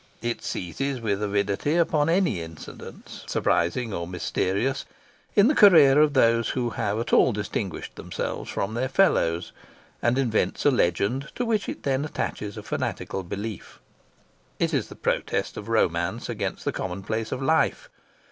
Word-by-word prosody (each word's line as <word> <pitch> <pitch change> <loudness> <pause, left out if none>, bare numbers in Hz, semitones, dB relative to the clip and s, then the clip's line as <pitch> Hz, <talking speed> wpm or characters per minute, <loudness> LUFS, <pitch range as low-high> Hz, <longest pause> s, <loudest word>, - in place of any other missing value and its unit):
It 120 0 -2
seizes 130 +10 -3
with 105 -3 -1
avidity 100 +7 0
upon 160 -3 +2
any 170 - +2
incidents, 80 -1 -10
surprising 110 +7 0
or 85 -2 -3
mysterious, 95 +7 -1 0.5
in 205 +2 +6
the 295 - +4
career 155 - +7
of 150 -1 +3
those 115 -3 +3
who 120 -2 -1
have 105 0 -1
at 115 - -3
all 130 - +6
distinguished 105 -3 -4
themselves - - -4
from 100 +2 -2
their 130 +3 -1
fellows, 85 - +2 0.5
and 120 +2 +2
invents 110 -8 0
a 145 - +6
legend 120 - +1
to 245 - -1
which 220 -3 0
it - - -6
then 135 0 0
attaches 105 -8 -4
a - - -7
fanatical 95 - -3
belief. 100 +3 -6 0.8
It - - 0
is - - 0
the - - -11
protest - - -1
of - - -7
romance - - 0
against - - -3
the - - +1
commonplace 100 +5 -3
of 130 - -2
life. 160 +4 +1
115 Hz, 155 wpm, -25 LUFS, 100-140 Hz, 0.8 s, career